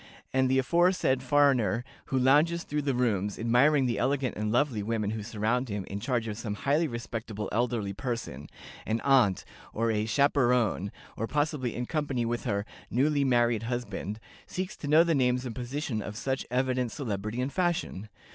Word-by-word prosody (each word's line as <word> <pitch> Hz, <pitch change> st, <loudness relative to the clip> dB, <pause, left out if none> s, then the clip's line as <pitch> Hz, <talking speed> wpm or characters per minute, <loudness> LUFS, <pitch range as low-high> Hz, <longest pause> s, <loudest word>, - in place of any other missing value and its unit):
And 130 Hz, 0 st, +3 dB
the 130 Hz, -, +3 dB
aforesaid 170 Hz, -1 st, +2 dB
foreigner, 130 Hz, -5 st, +3 dB, 0.2 s
who 135 Hz, -, -1 dB
lounges 150 Hz, +7 st, +4 dB
through 150 Hz, 0 st, -2 dB
the 140 Hz, -2 st, 0 dB
rooms, 105 Hz, -5 st, 0 dB
admiring 130 Hz, +5 st, +3 dB
the 120 Hz, -2 st, 0 dB
elegant 130 Hz, -1 st, 0 dB
and 105 Hz, 0 st, -2 dB
lovely 120 Hz, -2 st, +1 dB
women 110 Hz, -1 st, -1 dB
who 110 Hz, -1 st, -4 dB
surround 115 Hz, +3 st, -1 dB
him 100 Hz, -2 st, -3 dB
in 100 Hz, -, -5 dB
charge 120 Hz, 0 st, -1 dB
of 105 Hz, 0 st, -5 dB
some 105 Hz, -3 st, -3 dB
highly 145 Hz, +9 st, +1 dB
respectable 115 Hz, -4 st, -5 dB
elderly 115 Hz, -3 st, 0 dB
person, 110 Hz, -, -5 dB, 0.4 s
an 110 Hz, +1 st, 0 dB
'aunt,' 130 Hz, -9 st, +3 dB, 0.3 s
or 115 Hz, +1 st, +1 dB
a 105 Hz, 0 st, 0 dB
'chaperone,' 125 Hz, -7 st, +2 dB, 0.2 s
or 115 Hz, -, -3 dB
possibly 145 Hz, -4 st, -1 dB
in 125 Hz, -, -2 dB
company 140 Hz, -5 st, -1 dB
with 120 Hz, +1 st, -2 dB
her 100 Hz, 0 st, -1 dB, 0.2 s
'newly 140 Hz, +3 st, +2 dB
married 120 Hz, -4 st, +2 dB
husband,' 120 Hz, -3 st, -4 dB, 0.3 s
seeks 185 Hz, +1 st, -4 dB
to 145 Hz, -, -6 dB
know 155 Hz, +3 st, +6 dB
the 170 Hz, -1 st, +1 dB
names 125 Hz, -2 st, +1 dB
and 120 Hz, -, -4 dB
position 125 Hz, -1 st, -3 dB
of 105 Hz, +1 st, -6 dB
such 135 Hz, +3 st, -2 dB
evident 125 Hz, -1 st, 0 dB
celebrity 110 Hz, -3 st, -4 dB
and 130 Hz, +2 st, -2 dB
fashion. 175 Hz, -, -1 dB
125 Hz, 175 wpm, -28 LUFS, 110-140 Hz, 0.4 s, know